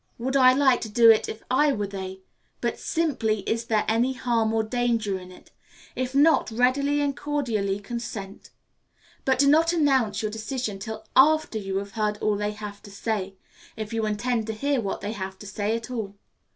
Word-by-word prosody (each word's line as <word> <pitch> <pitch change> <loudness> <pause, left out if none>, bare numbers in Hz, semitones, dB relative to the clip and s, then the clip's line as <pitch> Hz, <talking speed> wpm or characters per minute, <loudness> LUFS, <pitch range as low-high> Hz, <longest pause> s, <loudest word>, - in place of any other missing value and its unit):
Would 260 +3 -2
I 255 -2 +7
like 265 -2 +3
to 220 - -5
do 230 +1 +7
it 220 - +2
if 220 - -7
I 285 +3 +4
were 205 -3 -2
they? 190 -1 -7 0.4
but - - -2
simply, 250 - 0
Is 230 +3 -2
there 220 -2 +1
any 235 +4 +2
harm 235 -3 0
or 220 0 +1
danger 225 -4 0
in 180 0 -12
it? 180 - -17 0.4
If 255 +1 -3
not, 300 +1 +4
readily 270 +5 +2
and 285 -1 0
cordially 235 -9 -1
consent. 205 -2 -7 0.8
But 265 -1 +3
do 280 +2 +4
not 325 +4 +4
announce 260 -10 +2
your 215 - -1
decision 220 -1 -4
till 220 +2 -7
after 300 -4 +4
you 195 -1 -3
have 200 0 -4
heard 210 0 -1
all 210 0 0
that 210 - -3
they - - -2
have 210 -1 -8
to - - -13
say, 200 -1 -3 0.4
if 215 0 -5
you 225 -1 0
intend 225 +1 -1
to 220 - -2
hear 275 +3 0
what 200 - -4
they 205 - -3
have 190 -3 -6
to 210 - -12
say 205 +2 -2
at 230 +2 -6
all. 215 -5 -4
225 Hz, 200 wpm, -25 LUFS, 205-255 Hz, 0.8 s, I